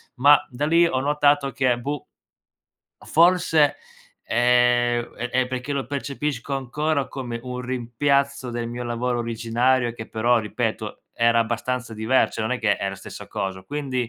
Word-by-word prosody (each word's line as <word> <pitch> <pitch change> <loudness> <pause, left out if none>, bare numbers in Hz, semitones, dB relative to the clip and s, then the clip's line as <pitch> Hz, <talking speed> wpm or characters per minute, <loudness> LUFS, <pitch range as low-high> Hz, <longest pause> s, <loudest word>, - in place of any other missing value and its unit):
ma 145 +3 +7
da 130 +4 -2
lì 170 +2 +5
ho 130 -6 0
notato 145 0 +2
che 130 -2 +1
boh 145 +3 -4 0.9
o - - -17
forse, 165 -3 +4 0.5
ehm, 120 0 +2
è 120 +1 -3
è 130 0 +2
perché 130 +2 -4
lo 140 -3 -2
percepisco 140 -1 -3
ancora 140 +2 -1
come 120 -3 -5
un 125 0 -5
rimpiazzo 130 +2 0
del 120 0 -3
mio 120 +1 -5
lavoro 120 +1 -1
originario 120 +2 +1
che 110 -1 -9
però, 120 +2 +2
ripeto, 105 -2 -3
era 115 0 +3
abbastanza 120 +1 -2
diver 110 +4 +2
cioè - - -5
non 110 +3 -1
è 125 - -1
che 105 -3 +2
è 100 - -2
la 95 - -4
stessa - - -10
coso. 95 -1 -4
Quindi, 130 -5 -3
125 Hz, 160 wpm, -23 LUFS, 120-140 Hz, 0.9 s, ma